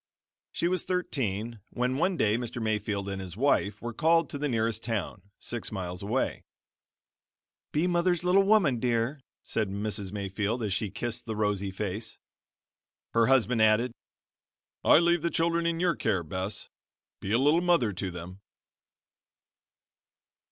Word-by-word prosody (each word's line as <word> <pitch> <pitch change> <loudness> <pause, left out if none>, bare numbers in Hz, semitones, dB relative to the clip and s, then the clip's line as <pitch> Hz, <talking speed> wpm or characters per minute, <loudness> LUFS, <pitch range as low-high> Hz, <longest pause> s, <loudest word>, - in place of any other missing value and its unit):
She 170 - 0
was 180 -1 +1
thirteen 120 - -2
when 125 +1 -1
one 180 +4 +1
day 105 -5 +3
Mr. 120 0 -4
Mayfield 105 -2 -1
and 95 -1 -4
his 95 0 -8
wife 110 -6 +1
were 120 0 -4
called 165 +6 +3
to 145 - -5
the 145 0 -1
nearest 115 -2 0
town, 110 -3 -3 0.2
six 120 -2 -4
miles 90 -3 -4
away. 110 +7 -1 1.3
"Be 155 +4 +1
mother's 175 -1 +1
little 180 +2 +5
woman, 195 - +3
dear," 120 +4 0 0.2
said 110 -3 -1
Mrs. 100 -1 -2
Mayfield 105 +3 -2
as 100 -3 0
she 100 +2 -1
kissed 120 +4 -4
the 110 - -3
rosy 105 -2 0
face. 105 +3 -4 1.0
Her 115 -1 +4
husband 125 -3 +3
added: 110 +3 +4 0.9
"I - - +7
leave 170 0 +3
the 170 - 0
children 170 0 +1
in 165 0 0
your 175 -2 +2
care, 95 -8 0
Bess; 95 +5 -4 0.5
be 100 - -4
a 115 - +4
little 145 +6 +4
mother 170 - +3
to 95 +1 -3
them." 90 +2 -9
115 Hz, 150 wpm, -28 LUFS, 100-150 Hz, 1.3 s, I